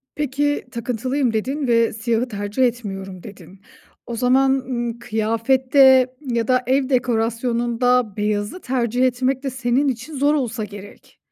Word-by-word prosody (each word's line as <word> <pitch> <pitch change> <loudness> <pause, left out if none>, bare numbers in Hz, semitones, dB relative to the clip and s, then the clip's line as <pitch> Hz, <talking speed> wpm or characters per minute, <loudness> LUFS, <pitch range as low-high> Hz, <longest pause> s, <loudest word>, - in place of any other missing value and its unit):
Peki, 290 0 -1
takıntılıyım 245 +2 -1
dedin 265 +5 -2
ve 230 -1 +3
siyahı 230 +2 -1
tercih 205 +2 -2
etmiyorum 195 -6 -3
dedin. 200 -2 -13 0.4
O 235 - -5
zaman, 260 +3 +3
ımm, 240 -3 -2
kıyafette 255 +4 +3 0.3
ya 230 -2 0
da 255 -1 +2
ev 265 0 +1
dekorasyonunda 240 -1 0
beyazı 210 - -2
tercih 250 -1 0
etmek 260 +2 0
de 270 - -1
senin 260 +2 0
için 265 +4 -4
zor 290 +2 +3
olsa 235 -5 -2
gerek. 205 -1 -12
245 Hz, 135 wpm, -21 LUFS, 225-265 Hz, 0.4 s, ve